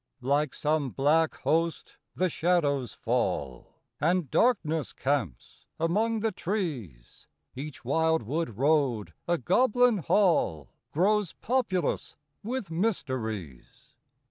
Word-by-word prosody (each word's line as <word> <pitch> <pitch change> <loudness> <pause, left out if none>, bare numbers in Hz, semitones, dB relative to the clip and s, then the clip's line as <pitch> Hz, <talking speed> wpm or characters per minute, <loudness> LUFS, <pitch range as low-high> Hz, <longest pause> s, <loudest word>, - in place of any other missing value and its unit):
III. 130 - -4
Like 145 0 +2
some 150 -2 0
black 155 +5 +2
host 165 +1 -1 0.2
the 185 - +2
shadows 150 - +1
fall, 65 -4 -2 0.2
And 165 -1 +1
darkness 165 - +1
camps 125 - -3
among 215 +7 +1
the 225 0 +1
trees; 145 - -5 0.3
Each 135 -1 -8
wildwood 160 -3 0
road, 135 -6 +1
a 175 0 +2
Goblin 245 - +3
Hall, 160 - +2 0.2
Grows 200 +3 +2
populous 220 - -1 0.3
with 225 -5 -4
mysteries. 120 - -3
160 Hz, 100 wpm, -28 LUFS, 130-185 Hz, 0.3 s, Goblin